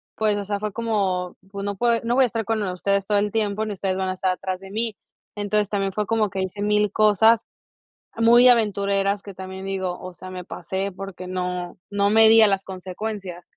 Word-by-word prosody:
pues, 215 -1 +1
o 200 - -4
sea, 205 0 -2
fue 210 0 -3
como 195 -6 -1 0.2
pues 200 0 -5
no 200 0 -2
pue 235 +3 +2
no 235 +1 0
voy 265 - +5
a - - +4
estar 225 -2 -3
con 225 0 0
ustedes 195 +1 0
todo 210 - +2
el 205 0 +1
tiempo, 215 -1 -1
ni 215 - -3
ustedes 190 -1 -2
van 190 -1 -1
a - - -1
estar 185 0 0
atrás 185 0 -4
de 195 - -12
mí. 225 0 -2 0.4
Entonces 205 0 0
también 195 -1 -1
fue 210 +1 -1
como 220 -1 +1
que 190 -1 -3
hice 190 +2 -5
1000 210 -1 +2
cosas 215 +2 +4 0.8
muy 235 +2 +6
aventureras 200 -3 +2
que 200 - -9
también 190 +1 -8
digo, 190 -2 -3
o 185 0 -8
sea, 185 +2 -10
me 185 -1 -7
pasé 190 +4 -4
porque 195 -1 -8
no 180 -1 -4
no 200 0 +1
medía 225 0 +7
las 195 -1 0
consecuencias. 190 -1 -6
200 Hz, 210 wpm, -23 LUFS, 190-215 Hz, 0.8 s, medía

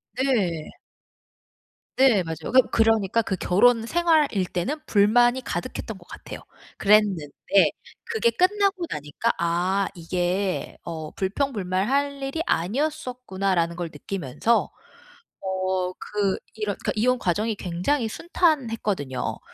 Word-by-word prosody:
네. 205 - 0 1.3
네. 255 -8 +5
맞아요. 160 +1 -5
그 260 - +8
그러니까 225 -1 +3
그 195 - -2
결혼 225 +6 +3
생활일 310 - +2
때는 210 - -3
불만이 240 +4 +4
가득했던 230 -4 -4
것 175 -1 -18
같아요. - - -9 0.4
그랬는데 200 -7 +3 0.8
그게 465 +1 +1
끝나고 390 -1 +2
나니까 150 +10 -1
'아 175 +4 +1
이게 180 +2 -2
어 160 -2 -6
불평불만할 245 +5 -1
일이 275 +4 -2
아니었었구나.'라는 195 - -1
걸 175 -1 -4
느끼면서 195 - -1 0.7
어 185 -1 -1
그 200 -2 -1 0.2
이런 210 -2 -2
그니까 - - -2
이혼 250 +4 +2
과정이 210 +3 0
굉장히 195 +9 -1
순탄했거든요. 225 - -1
205 Hz, 265 characters per minute, -24 LUFS, 180-255 Hz, 1.3 s, 그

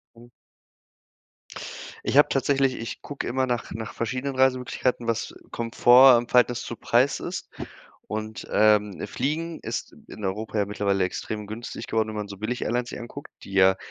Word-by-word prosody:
Mhm. 120 +1 -15 1.8
Ich - - 0
hab 145 - +6
tatsächlich 135 -1 +2
ich 115 - -6
gucke 145 - -5
immer 130 +2 0
nach 120 -2 -2
nach 110 -1 -6
verschiedenen 130 +4 -3
Reisemöglichkeiten, 130 -2 +1
was 115 -1 -2 0.2
Komfort 120 +2 +6
im 120 - -3
Verhältnis 125 -1 +3
zu - - -5
Preis - - +2
ist. - - -5 0.6
Und, 110 +1 -5
ähm, 105 -2 +3
Fliegen 160 +5 -3
ist - - -5
in 105 - -9
Europa 105 +3 -3
ja 100 - +2
mittlerweile 100 -2 0
extrem 105 +3 -4
günstig 110 +3 -7
geworden, 110 -1 0
wenn 110 - -5
man 105 -1 -4
so 100 - -8
Billig-Airlines 120 +3 -2
sich - - -7
anguckt, 120 +4 -9
die 100 - -11
ja 95 0 +5
115 Hz, 160 wpm, -25 LUFS, 105-130 Hz, 1.8 s, hab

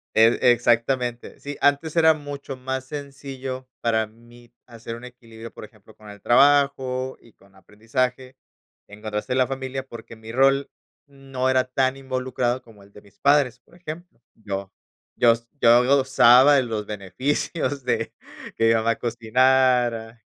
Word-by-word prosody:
E 115 +1 +5
exactamente. 120 +1 0
Sí, 145 0 -7
antes 145 +3 +1
era 160 -1 +5
mucho 145 -2 -8
más 130 0 -5
sencillo 135 -2 -7
para 110 -1 +1
mí 120 +2 -19
hacer 115 -1 -8
un 120 +1 -11
equilibrio, 115 -2 -12
por - - -10
ejemplo, 105 0 -20
con 105 - -17
el 100 - -14
trabajo, 130 -1 +2
y 115 - -22
con 100 0 -25
aprendizaje, 125 +6 -4 0.5
en 105 +1 -14
contraste 105 +1 -5
en 130 - 0
la 130 - +3
familia, 135 0 -5
porque 115 -1 -11
mi 110 0 -11
rol 135 +2 +2 0.4
no 135 -2 -4
era 130 0 +3
tan 130 +1 -1
involucrado 130 -2 -2
como 110 -5 -18
el 100 +1 -21
de 105 - -14
mis 100 -1 -23
padres, 140 -4 +2
por - - -24
ejemplo. 175 -4 -10
Yo 100 -3 -6 0.4
yo 120 -1 +5 0.3
yo 120 +1 +6
gozaba 130 0 +5
de 135 - +3
los 110 -3 -4
beneficios 130 - -3
de 115 -2 -2 0.4
que 115 0 +3
mamá 115 0 +1
cocinara. 120 -1 +1
125 Hz, 150 wpm, -23 LUFS, 115-135 Hz, 0.5 s, yo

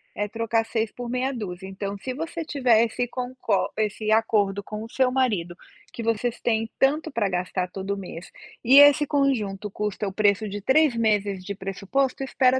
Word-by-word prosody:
é 205 0 -1
trocar 230 0 0
6 225 -1 -2
por 245 -1 -6
meia 255 +2 -1
dúzia, 190 -5 -6
então 200 +1 -5
se 255 +5 -5
você 325 +2 -5
tivesse 245 -4 +2
com 250 0 -5
cor 215 -5 0
esse 215 0 -1
acordo 205 -3 +1
com 215 +1 -6
o 225 - -8
seu 255 -1 +1
marido 200 -10 0 0.3
que 235 - -7
vocês 230 +1 -1
têm 225 -1 0
tanto 285 +3 +2
para 220 -6 0
gastar 180 0 -2
todo 195 +1 -4
mês 180 -2 -9 0.3
e 265 +4 +8
esse 290 +1 +7
conjunto 220 -9 0
custa 210 0 -3
o 190 - -5
preço 210 +1 +2
de 205 0 -5
3 270 +2 +3
meses 205 -4 0
de 200 - -4
pressuposto, 200 +8 -2
espera 260 -1 +2
220 Hz, 180 wpm, -25 LUFS, 200-255 Hz, 0.3 s, e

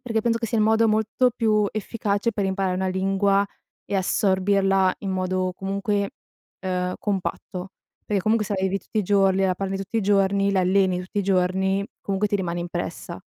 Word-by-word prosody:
perché 225 -3 -1
penso 230 0 +1
che 230 - -2
sia 225 - -1
il 215 - +4
modo 220 +1 +4
molto 220 +4 +2
più 215 -3 +2
efficace 215 0 -1
per 205 -2 -1
imparare 190 -1 0
una 190 +1 -1
lingua, 195 +1 +2 0.4
e 200 - -1
assorbirla 195 0 +2
in 195 - -3
modo 185 0 -1
comunque, 200 +1 -1 0.5
ehm, 180 -1 -2
compatto, 190 -1 -3 0.4
perché 200 -3 0
comunque 215 0 +2
se 205 - -2
la 190 - -2
vivi 190 +1 +1
tutti 215 - -5
i - - +2
giorni, 195 -1 +3
la 185 -1 +2
parli 195 +1 -3
tutti 200 +4 -3
i - - +1
giorni, 200 0 +2
la 190 - +3
alleni 185 0 +2
tutti 185 +3 -5
i - - +1
giorni, 190 +1 +1 0.2
comunque 200 +1 -1
ti 205 - -1
rimane 175 -3 -3
impressa. 175 0 -5
195 Hz, 190 wpm, -24 LUFS, 190-205 Hz, 0.5 s, il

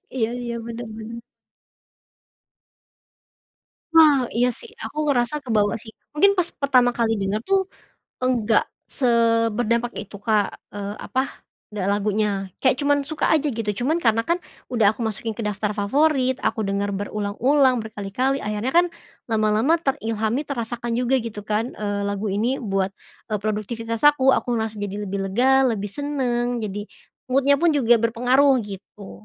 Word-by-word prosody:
Iya 225 -3 +1
iya, 235 -1 -4
bener 235 0 -6
bener. 225 +1 -7 2.7
Wah, 300 -5 +6
iya 245 +2 +3
sih. 240 - -6
Aku 300 +7 -3
ngerasa 270 -1 +1
kebawa 210 -4 +1
sih, 220 0 -10 0.2
mungkin 400 +6 +5
pas 350 -1 +1
pertama 255 -3 +3
kali 230 -1 +1
denger 195 +2 -1
tuh, 390 0 +3 0.6
enggak 235 -4 +2 0.2
seberdampak 235 -1 +1
itu 205 0 -11
Kak, 205 0 0 0.2
eee, 205 0 -5
apa, 260 - -1 0.5
lagunya, 205 0 -1
kayak 265 - +3
cuman 285 0 +3
suka 310 0 -1
aja, 310 -1 +3
gitu. 220 -2 -2 0.2
Cuman 325 +4 +1
karena 225 0 +2
kan, 350 +1 0 0.3
udah 220 -4 +4
aku 225 +1 -3
masukin 220 +1 -3
ke 230 - -4
daftar 210 0 -1
favorit, 260 +4 +2
aku 220 -2 0
denger 200 +1 -1
berulang-ulang, 215 +7 +1
berkali-kali, 220 +5 -2
akhirnya 210 +5 -2
kan, 350 +1 +6 0.4
lama-lama 220 +8 +2
terilhami, 225 -4 -1
terasakan 240 -4 -4
juga 250 +1 +1
gitu 210 -3 -7
kan, 215 +3 -1
eee, 205 -1 -2
lagu 200 +1 -3
ini 225 +7 0
buat, 195 -4 -1 0.4
eee, 210 - 0
produktivitas 220 +2 -3
aku, 280 -3 +5
aku - - -2
ngerasa 220 -1 -2
jadi 200 0 -4
lebih 200 +1 -3
lega, 265 +6 +4
lebih 205 -2 -2
seneng. 245 -4 -1
Jadi 205 -1 -5 0.4
mood-nya 275 +2 +4
pun 330 +4 +3
juga 250 -6 +4
berpengaruh, 250 +4 +3
gitu. 200 0 -10
230 Hz, 145 wpm, -23 LUFS, 210-265 Hz, 2.7 s, Wah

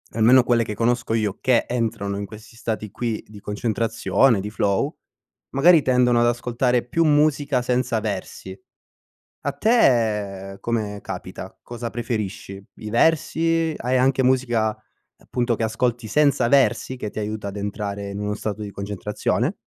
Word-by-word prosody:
almeno 120 +3 +6
quelle 120 -1 +2
che 105 -1 -5
conosco 120 +1 0
io, 105 -3 0
che 125 -2 +3
entrano 110 -4 -2
in 100 - -4
questi 110 +2 -13
stati 110 -3 -4
qui 115 0 -3
di 105 -1 -12
concentrazione, 110 +1 +1
di 105 - -5
flow, 105 - 0 0.5
magari 160 +3 +6
tendono 125 -2 +3
ad - - +4
ascoltare 120 +1 0
più 165 +7 +1
musica 145 -3 +2
senza 125 -2 0
versi. 95 -2 -5 0.9
A - - +1
te 105 - +1
come 105 -3 -2
capita? - - -7
Cosa 120 -1 -6
preferisci? 105 -4 -4
I 110 - -8
versi, 165 +4 +2
hai 125 +2 0
anche 130 +1 +3
musica, 120 -4 +2 0.4
appunto, 120 -2 -1
che 115 - -3
ascolti 115 +1 -1
senza 140 0 +3
versi 135 -1 +2
che 105 - -4
ti - - -5
aiuta 105 -1 -4
ad 100 - -8
entrare 100 0 -4
in 100 - -5
uno 105 0 -2
stato 105 0 -4
di 105 - -5
concentrazione? 100 +1 -2
115 Hz, 150 wpm, -23 LUFS, 105-125 Hz, 0.9 s, almeno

